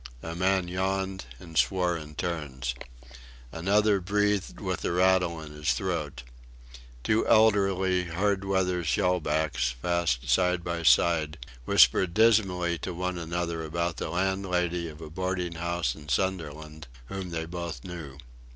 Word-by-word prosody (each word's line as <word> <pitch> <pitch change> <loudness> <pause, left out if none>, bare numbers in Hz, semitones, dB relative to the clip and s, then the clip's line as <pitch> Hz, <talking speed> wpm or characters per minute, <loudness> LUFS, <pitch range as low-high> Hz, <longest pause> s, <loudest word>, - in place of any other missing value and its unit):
A 80 - -5
man 95 +1 +1
yawned 95 -1 -2
and 80 +3 -12
swore 90 0 +2
in 75 -2 -8
turns. 70 -8 -3 0.8
Another 100 +4 +2
breathed 105 +1 0
with 95 -4 -3
a - - 0
rattle 90 -1 +2
in 80 -2 -9
his 75 0 0
throat. - - -3 0.8
Two 110 0 +1
elderly 95 -4 +3
hard 95 +3 0
weather 95 -2 0
shellbacks, 75 -7 0
fast 85 -4 0
side 90 -1 +2
by 85 -1 -3
side, 80 -1 +3 0.3
whispered 85 +8 +4
dismally 95 -7 +3
to 90 - -5
one 90 0 -2
another 85 0 -3
about 85 +1 -2
the - - -3
landlady 90 -2 -1
of 75 +1 -12
a 80 - -8
boarding 90 0 -2
house 85 0 -1
in 75 -1 -12
Sunderland, 80 -2 -2 0.2
whom 95 +6 -6
they 80 -1 -3
both 85 -5 -6
knew. 80 -7 -8
85 Hz, 135 wpm, -28 LUFS, 80-95 Hz, 0.8 s, whispered